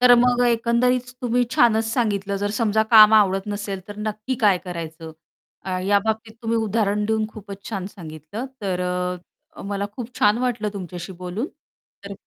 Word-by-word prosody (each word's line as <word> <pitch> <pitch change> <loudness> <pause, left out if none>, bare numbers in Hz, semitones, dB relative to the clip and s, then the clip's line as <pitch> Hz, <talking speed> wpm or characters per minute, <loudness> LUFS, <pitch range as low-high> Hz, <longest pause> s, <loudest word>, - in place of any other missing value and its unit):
तर 245 0 +8
मग 245 0 +3
एकंदरीत 240 +2 +2
तुम्ही 245 0 +2
छानच 225 -2 +4
सांगितलं. 210 -4 -1
जर 205 - 0
समजा 220 -1 +2
काम 215 -1 +9
आवडत 195 -2 +3
नसेल 205 -1 -4
तर 205 - -8
नक्की 215 +4 -3
काय 195 -3 +5
करायचं? 165 -2 -7 0.7
या 200 0 +5
बाबतीत 220 0 -2
तुम्ही 230 0 0
उदाहरण 210 -1 0
देऊन 220 0 +1
खूपच 200 -2 -10
छान 195 -3 -3
सांगितलं. 170 - -8
तर 185 -3 -2 0.8
अ, - - -8
मला 200 0 -3
खूप 245 0 -7
छान 210 +2 +4
वाटलं 240 -4 -1
तुमच्याशी 180 -2 -7
बोलून. 185 +8 -3 0.6
तर 200 - -7
210 Hz, 155 wpm, -22 LUFS, 195-230 Hz, 0.8 s, काम